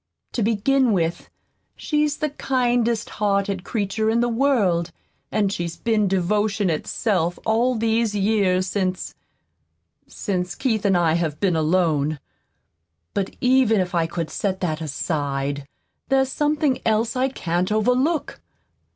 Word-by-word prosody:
To 240 - -2
begin 230 +3 +2
with, 170 -2 -1 0.5
she's 300 -1 0
the 305 -2 -2
kindest 245 -4 0
hearted 200 -2 +1
creature 215 +1 -1
in 230 +1 +2
the 240 0 +2
world, 220 -10 +1 0.4
and 205 -2 +1
she's 170 -2 -3
been 220 -3 +1
devotion 200 +1 +1
itself 175 +1 -1
all 235 +3 +2
these 225 -1 +1
years 195 -3 +2
since 185 -1 -2 0.9
since 180 -2 -3
Keith 220 -5 -1
and 195 -2 +4
I 165 -2 +2
have 160 -3 -1
been 190 -4 +1
alone. 155 -2 +1 0.9
But 195 -1 -2
even 250 -4 +4
if 185 0 -2
I 165 -2 +1
could 165 -1 -4
set 190 -2 -2
that 160 -3 -1
aside, 140 -2 -2 0.4
there's 265 -1 +2
something 295 -1 +1
else 225 +2 +1
I 260 +1 +1
can't 180 -5 -2
overlook. 250 +9 +1
205 Hz, 130 wpm, -22 LUFS, 175-235 Hz, 0.9 s, and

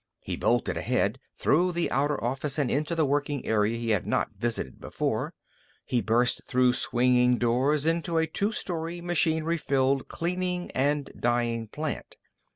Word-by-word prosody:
He - - -3
bolted - - +1
ahead, - - 0 0.2
through 175 +5 +2
the 170 0 0
outer 145 -1 0
office 135 +4 -2
and 140 -5 +1
into 150 +4 0
the 160 -2 +2
working 145 0 -1
area 110 +1 +1
he 115 -1 -1
had 105 -4 0
not - - 0
visited 115 - -3
before. - - -2 0.5
He 120 - 0
burst 120 +3 +2
through 125 -1 +3
swinging 125 0 +3
doors 130 +6 +2
into 165 +1 +1
a 160 - +3
two 200 +7 -1
story, 170 -4 -3
machinery 165 -1 +1
filled 135 -2 +1
cleaning 180 +1 -2
and 145 +2 0
dyeing 120 -1 0
plant. 150 +6 -5
140 Hz, 155 wpm, -27 LUFS, 120-165 Hz, 0.5 s, through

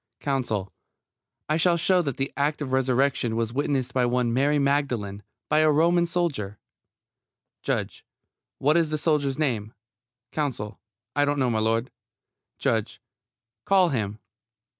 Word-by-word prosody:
COUNSEL: 115 -9 -2 0.7
I 155 - +1
shall 170 +1 +3
show 180 +2 +3
that 140 -7 -3
the 135 +1 -2
act 145 +2 0
of 130 - -5
resurrection 130 -2 +1
was 115 0 -1
witnessed 135 -2 -1
by 125 -2 +2
one 120 -1 +1
Mary 140 +4 +2
Magdalene, 140 -8 0 0.3
by 155 - +3
a 155 0 +5
Roman 170 +3 +3
soldier 145 - -2 1.0
JUDGE: - - -2 0.5
What 150 +4 +3
is 165 -2 +2
the 155 - -1
soldier's 145 -3 +1
name? 115 -8 -1 0.6
COUNSEL: 125 -8 -3 0.4
I 145 - +3
don't 145 0 +1
know, 130 -3 +1
m'lud. 115 +2 +1 0.7
JUDGE: - - -1 0.7
Call 190 -3 +4
him. 110 -7 -2
140 Hz, 135 wpm, -25 LUFS, 115-150 Hz, 1.0 s, a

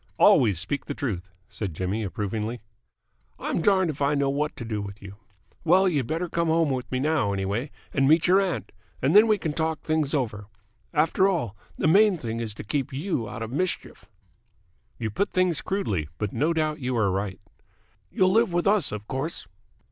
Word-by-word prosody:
"Always 105 -9 +5
speak 90 +11 -3
the 145 - -4
truth," 100 -8 -3 0.2
said 95 -7 -5
Jimmy 95 +6 -2
approvingly. 105 +3 -3 0.8
"I'm - - -2
darned 190 -3 +3
if 145 - -11
I 140 +1 +2
know 140 -1 +1
what 150 +2 -1
to 115 - -7
do 110 -2 -3
with 100 +1 -7
you. 100 0 -11 0.5
Well, 185 +3 +5
you'd 145 -9 0
better 165 +5 -1
come 170 0 -1
home 160 -2 +2
with 130 -1 -3
me 130 - 0
now, 140 -8 +1
anyway, 100 +8 -2 0.2
and 135 -1 +3
meet 160 +3 +5
your 190 +2 +5
aunt, 190 -3 -2 0.3
and 140 +7 +1
then 215 +2 +8
we 215 -1 +3
can 160 -6 -3
talk 160 -1 -2
things 155 -2 0
over. 105 -7 -2 0.4
After 165 +5 +3
all, 135 - -2 0.2
the - - +1
main 200 +3 +5
thing 115 -6 -4
is 110 -3 -4
to - - -7
keep 135 +5 -2
you 135 - -2
out 125 -2 -5
of 115 - -6
mischief." 180 +6 -3 0.9
"You 110 -2 -3
put 200 - 0
things 185 -4 +1
crudely, 100 - -2
but 105 0 -3
no 150 +8 +1
doubt 155 -1 0
you 125 -2 -2
are 105 -4 +2
right." 95 0 -3 0.7
"You'll 185 0 +3
live 225 0 +3
with 175 0 0
us, 200 -2 +3
of 105 0 -6
course." 135 - -4
140 Hz, 195 wpm, -26 LUFS, 110-165 Hz, 0.9 s, then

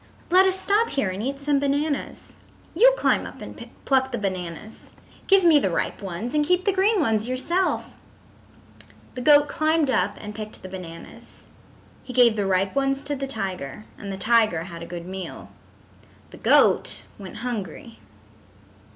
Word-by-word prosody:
Let 375 +2 +6
us 380 0 +3
stop 420 +4 +2
here 215 -9 -1
and 190 +2 -5
eat 275 +4 -3
some 285 0 +1
bananas. 285 +1 -2 0.4
You - - +5
climb - - +1
up - - -12
and - - -10 0.2
pluck 265 -1 +2
the 240 - -2
bananas. 190 0 -6 0.3
Give 390 -1 +5
me 325 -4 +6
the 195 - 0
ripe 170 - -2
ones, 195 +5 -5
and 300 -1 +2
keep 360 +4 +1
the 400 - +2
green 395 +3 +3
ones 225 -7 +1
yourself." 340 +9 -1 1.2
The 255 - -6
goat 290 +2 +6
climbed 310 -1 +1
up 230 - 0
and 210 0 -8
picked 215 0 -9
the 185 - -8
bananas. 170 -3 -11 0.6
He 255 - -9
gave 240 -3 +5
the 205 -2 -1
ripe 190 0 +1
ones 275 0 0
to 290 - -2
the 275 0 -4
tiger 195 - -5
and 200 -1 -7
the 190 - -5
tiger 215 -5 +2
had 170 -2 -9
a 170 - -7
good 175 -1 -7
meal. 190 0 -8 0.8
The - - -12
goat - - +3 0.2
went 190 -2 -9
hungry. 230 - -6
245 Hz, 170 wpm, -24 LUFS, 195-295 Hz, 1.2 s, Let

